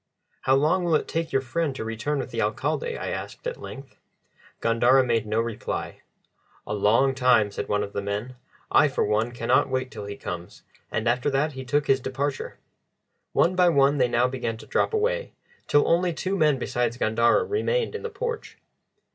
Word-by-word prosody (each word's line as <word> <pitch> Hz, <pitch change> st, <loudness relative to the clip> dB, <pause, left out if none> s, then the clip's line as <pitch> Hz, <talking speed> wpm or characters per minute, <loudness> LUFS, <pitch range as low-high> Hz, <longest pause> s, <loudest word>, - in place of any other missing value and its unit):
"How 130 Hz, -, +3 dB
long 155 Hz, +7 st, +2 dB
will 170 Hz, -2 st, +2 dB
it -, -, 0 dB
take 165 Hz, 0 st, -2 dB
your 135 Hz, -, +1 dB
friend 140 Hz, +3 st, -1 dB
to 110 Hz, -, -5 dB
return 115 Hz, +7 st, -2 dB
with -, -, -4 dB
the -, -, -2 dB
Alcalde?" 475 Hz, -1 st, -1 dB
I -, -, -4 dB
asked -, -, -6 dB
at -, -, -4 dB
length. 135 Hz, 0 st, -10 dB, 0.6 s
Gandara 120 Hz, +3 st, +4 dB
made 115 Hz, -3 st, 0 dB
no 110 Hz, +1 st, 0 dB
reply. 115 Hz, -1 st, -4 dB, 0.6 s
"A -, -, -4 dB
long 110 Hz, +6 st, +3 dB
time," 125 Hz, -5 st, +3 dB
said -, -, -4 dB
one 105 Hz, 0 st, +1 dB
of 100 Hz, -, -7 dB
the -, -, -2 dB
other 100 Hz, -, -6 dB
men. 105 Hz, +5 st, -3 dB, 0.4 s
"I, 150 Hz, -, +6 dB
for 135 Hz, -, 0 dB
one, 110 Hz, +3 st, +1 dB
cannot 120 Hz, +2 st, +2 dB
wait 130 Hz, 0 st, -2 dB
till 105 Hz, -, -7 dB
he 100 Hz, -, -6 dB
comes," 85 Hz, 0 st, -7 dB, 0.3 s
and 110 Hz, +1 st, -1 dB
after 125 Hz, +4 st, +2 dB
that 145 Hz, +3 st, +1 dB
he 130 Hz, 0 st, -6 dB
took 145 Hz, +3 st, 0 dB
his 135 Hz, -2 st, +3 dB
departure. 135 Hz, +2 st, -3 dB, 0.8 s
One 175 Hz, +3 st, +3 dB
by 180 Hz, -1 st, +5 dB
one 140 Hz, -2 st, +3 dB
they 125 Hz, -, +4 dB
now 120 Hz, +1 st, +2 dB
began 125 Hz, -3 st, -3 dB
to -, -, -12 dB
drop -, -, +1 dB
away, -, -, 0 dB, 0.3 s
till 145 Hz, -, +3 dB
only 175 Hz, +1 st, +2 dB
two 190 Hz, +4 st, -2 dB
men 150 Hz, -6 st, +3 dB
besides 120 Hz, -1 st, -1 dB
Gandara 115 Hz, +1 st, +3 dB
remained 450 Hz, +3 st, 0 dB
in 445 Hz, -, -5 dB
the 460 Hz, -, -4 dB
porch. 470 Hz, +2 st, -5 dB
130 Hz, 195 wpm, -25 LUFS, 115-160 Hz, 0.8 s, I